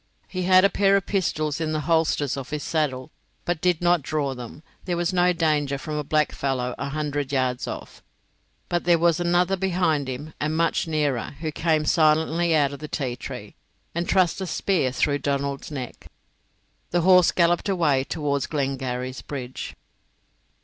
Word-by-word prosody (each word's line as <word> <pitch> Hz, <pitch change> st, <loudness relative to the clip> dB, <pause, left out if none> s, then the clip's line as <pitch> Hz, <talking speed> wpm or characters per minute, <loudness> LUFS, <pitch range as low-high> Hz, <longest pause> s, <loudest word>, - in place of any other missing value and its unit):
He 185 Hz, -1 st, -3 dB
had 185 Hz, +1 st, +6 dB
a -, -, +5 dB
pair 195 Hz, -1 st, +3 dB
of 195 Hz, -, -3 dB
pistols 155 Hz, -5 st, -1 dB
in 155 Hz, -1 st, -1 dB
the 155 Hz, -, -1 dB
holsters 160 Hz, -3 st, +1 dB
of 135 Hz, -2 st, -6 dB
his 150 Hz, -1 st, -3 dB
saddle, 135 Hz, -5 st, -1 dB, 0.3 s
but 175 Hz, -1 st, 0 dB
he 180 Hz, -, +5 dB
did 175 Hz, 0 st, -7 dB
not 175 Hz, -2 st, +4 dB
draw 140 Hz, -1 st, -1 dB
them: 125 Hz, +4 st, -9 dB, 0.2 s
there 175 Hz, -2 st, -1 dB
was 175 Hz, +2 st, 0 dB
no 180 Hz, 0 st, +4 dB
danger 150 Hz, -5 st, +1 dB
from 155 Hz, +3 st, -6 dB
a 150 Hz, 0 st, -1 dB
blackfellow 135 Hz, -4 st, 0 dB
a -, -, -3 dB
hundred 145 Hz, -1 st, -2 dB
yards 130 Hz, -2 st, 0 dB
off. -, -, -7 dB, 0.7 s
But 175 Hz, 0 st, -1 dB
there 175 Hz, -1 st, +5 dB
was 170 Hz, 0 st, +2 dB
another 175 Hz, +2 st, +2 dB
behind 175 Hz, -6 st, 0 dB
him 145 Hz, +5 st, -6 dB
and 155 Hz, +2 st, -1 dB
much 165 Hz, 0 st, +1 dB
nearer, 145 Hz, -5 st, -1 dB
who 160 Hz, -2 st, -2 dB
came 155 Hz, 0 st, +1 dB
silently 160 Hz, +2 st, +3 dB
out 145 Hz, -2 st, +2 dB
of 140 Hz, -, -8 dB
the 150 Hz, -, -6 dB
ti 130 Hz, -5 st, -3 dB
tree 125 Hz, -, -8 dB, 0.4 s
and 170 Hz, +1 st, -2 dB
thrust 185 Hz, -1 st, +2 dB
a 190 Hz, -, -3 dB
spear 175 Hz, -6 st, 0 dB
through 145 Hz, +2 st, +1 dB
Donald's 140 Hz, -1 st, -2 dB
neck. 130 Hz, -5 st, -7 dB, 0.8 s
The 175 Hz, -, +1 dB
horse 180 Hz, 0 st, +6 dB
galloped 175 Hz, +2 st, +2 dB
away 155 Hz, -8 st, +2 dB
towards 140 Hz, -1 st, -2 dB
Glengarry's 130 Hz, -3 st, -3 dB
bridge. 130 Hz, -3 st, -6 dB
155 Hz, 175 wpm, -24 LUFS, 140-175 Hz, 0.8 s, had